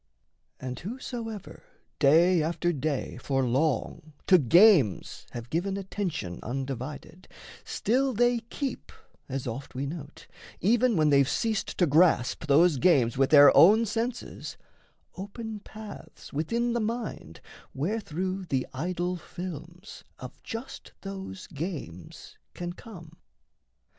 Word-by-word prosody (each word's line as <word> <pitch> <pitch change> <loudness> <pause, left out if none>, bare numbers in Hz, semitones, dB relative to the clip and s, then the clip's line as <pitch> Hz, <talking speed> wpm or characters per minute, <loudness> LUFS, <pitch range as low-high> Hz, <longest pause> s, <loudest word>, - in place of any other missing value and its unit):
And 130 -1 -5
whosoever 225 0 -7 0.4
Day 165 +5 +5
after 170 +2 0
day 145 -3 -3
for 135 +1 -1
long 145 +3 -1
to 185 -2 +6
games 160 - +4
have 120 0 -7
given 190 +4 -1
Attention 185 - -4
undivided, 135 +7 -6 0.4
still 265 +4 0
they 240 +1 +2
keep 245 +3 -5 0.4
(As 135 -1 -3
oft 130 +3 -6
we 135 +2 -2
note), 150 0 -8 0.3
even 235 +3 +3
when 155 -3 +3
they've 140 -1 +4
ceased 220 -3 -1
to 180 - +4
grasp 155 -2 +3
Those 155 +2 +5
games 130 -7 +3
with 135 0 +2
their 145 -2 +8
own 215 +6 +7
senses, 230 +3 -4 0.6
open 215 +3 -6
paths 215 +1 -11
Within 230 +11 0
the 235 - 0
mind 220 - -4 0.4
wherethrough 185 +2 -2
the 130 -2 0
idol 175 +5 -2
films 175 +2 -9
Of - - -10
just 230 +3 -8
those 195 -1 -7
games 145 - -7 0.2
can 175 0 -5
come. 170 -6 -12
175 Hz, 120 wpm, -28 LUFS, 140-210 Hz, 0.6 s, their